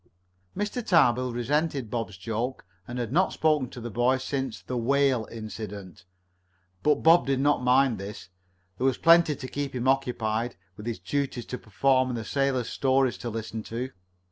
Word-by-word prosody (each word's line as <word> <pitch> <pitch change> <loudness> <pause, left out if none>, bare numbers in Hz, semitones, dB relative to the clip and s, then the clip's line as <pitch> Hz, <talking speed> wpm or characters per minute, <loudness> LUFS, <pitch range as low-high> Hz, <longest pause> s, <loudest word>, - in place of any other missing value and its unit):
Mr. 210 +4 -2
Tarbill 130 - +3
resented 135 0 -1
Bob's 115 -5 -3
joke, 115 +6 -3 0.2
and 120 - -6
had 120 -2 -3
not 185 +6 +2
spoken 150 -5 +2
to - - -9
the 120 0 -6
boy 120 +4 +2
since 130 -5 -3
the 125 - -4
"whale" 130 -1 +2
incident. 105 -5 -8 0.8
But 150 0 +2
Bob 165 0 +6
did 135 -1 +1
not 145 0 +2
mind 125 -2 +3
this. 100 -2 -8 0.5
There 130 - 0
was 130 - +1
plenty 165 -2 +5
to 130 - -7
keep 140 0 -4
him 125 +1 -1
occupied, 120 -3 0 0.2
with 105 +2 -9
his 115 - -2
duties 140 -4 -2
to 125 - -6
perform 130 +5 +2
and 110 - -5
sailors' 135 -4 0
stories 130 -1 +1
to 120 - -4
listen 110 0 -5
to. 125 +3 -4
125 Hz, 170 wpm, -27 LUFS, 115-140 Hz, 0.8 s, Bob